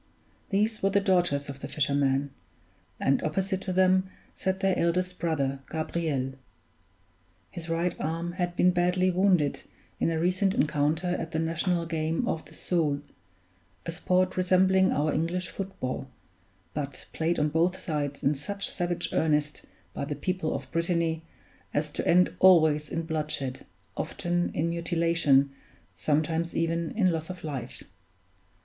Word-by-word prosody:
These 215 +2 +1
were 195 - +3
the 200 +1 +3
daughters 175 -8 +2
of 140 -1 -7
the - - -6
fisherman; 140 -1 +1 0.7
and 135 - +2
opposite 190 +4 -1
to 190 - -3
them 185 0 +3 0.2
sat 190 0 -2
their 195 -1 +2
eldest 180 +2 0
brother, 140 -5 0
Gabriel. 155 -4 -2 1.2
His 170 -1 -7
right 170 +1 0
arm 165 +2 -2
had 175 -1 -2
been 180 - +4
badly 180 +1 +2
wounded 180 -6 +2 0.4
in - - +2
a 165 -1 0
recent 185 +3 +2
encounter 150 +3 +1
at 165 -2 -3
the - - 0
national 165 +2 0
game 160 0 -1
of 160 - -1
the - - -14
Soule, 150 -5 0 0.8
a 170 - -2
sport 185 +2 +1
resembling 185 +1 +4
our 150 +1 +1
English 175 +3 -1
foot 195 -1 -6
ball; 130 +1 -3 0.7
but 140 -2 -5
played 165 +2 0
on 150 0 +2
both 170 +4 +2
sides 145 -3 -3
in 140 - +3
such 200 +8 -4
savage 175 -1 -2
earnest 150 -1 +1 0.3
by - - -4
the 145 +1 -3
people 170 +2 -2
of - - -7
Brittany 165 -1 0 0.5
as 150 +1 0
to - - -3
end 180 +1 +5
always 155 -5 +5
in 165 - -2
bloodshed, 150 -5 -3 0.3
often 175 0 -1
in 165 +2 0
mutilation, 165 -5 +2 0.4
sometimes 155 - 0
even 165 0 0
in 185 -5 +4
loss 160 0 -3
of 180 -1 -7
life. 145 -5 -5
165 Hz, 145 wpm, -28 LUFS, 150-180 Hz, 1.2 s, end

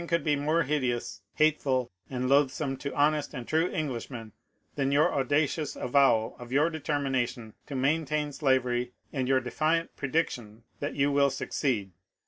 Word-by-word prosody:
You - - -6
are 170 - +1
aware - - +5
that - - -7
nothing - - -13
could 145 - 0
be 145 - -4
more 165 +2 +3
hideous, 130 -7 -2
hateful, 140 -5 +2 0.2
and 130 -1 -2
loathsome 140 0 +2
to 140 +1 -5
honest 150 0 +1
and 125 -2 -6
true 160 +3 +2
Eng 155 -2 -2
lishmen 115 -2 -6 0.4
than 140 -1 0
your 145 +2 +3
audacious 145 +3 0
avowal 125 -4 +2
of 120 0 -10
your 150 +5 +3
determination 135 -7 -2
to 145 - -6
maintain 150 +2 0
slavery 125 -3 +1 0.2
and 130 -3 -1
your 130 0 +3
defiant 155 +6 0
prediction 120 -7 -2 0.2
that 145 - -3
you 140 0 +2
will 140 0 +4
succeed. 115 -8 -2
140 Hz, 175 wpm, -28 LUFS, 125-150 Hz, 0.4 s, aware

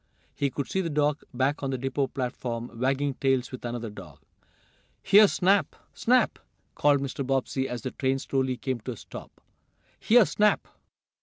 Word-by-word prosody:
He 140 - 0
could 140 +1 -4
see 190 - -1
the 170 - -2
dog, 150 0 +1
back 135 +3 0
on 135 - -2
the 130 - -1
depot 135 +2 -1
platform, 120 -3 -5
"wagging 135 +2 0
tails" 130 -1 0
with 130 - -8
another 120 -2 -4
dog. 105 - -11 0.9
"Here, 210 +1 +7
Snap! 195 +1 +2 0.2
Snap!" 250 +1 +2 0.3
called 145 -1 +3
Mr. 140 0 -3
Bobbsey, 135 0 -1
as 120 -2 -5
the 130 - -3
train 135 0 0
slowly 130 -1 -1
came 130 -1 -3
to 125 +3 -5
a - - -12
stop. - - -10 0.7
"Here 235 0 +5
Snap!" 210 0 +2
135 Hz, 165 wpm, -27 LUFS, 125-145 Hz, 0.9 s, Here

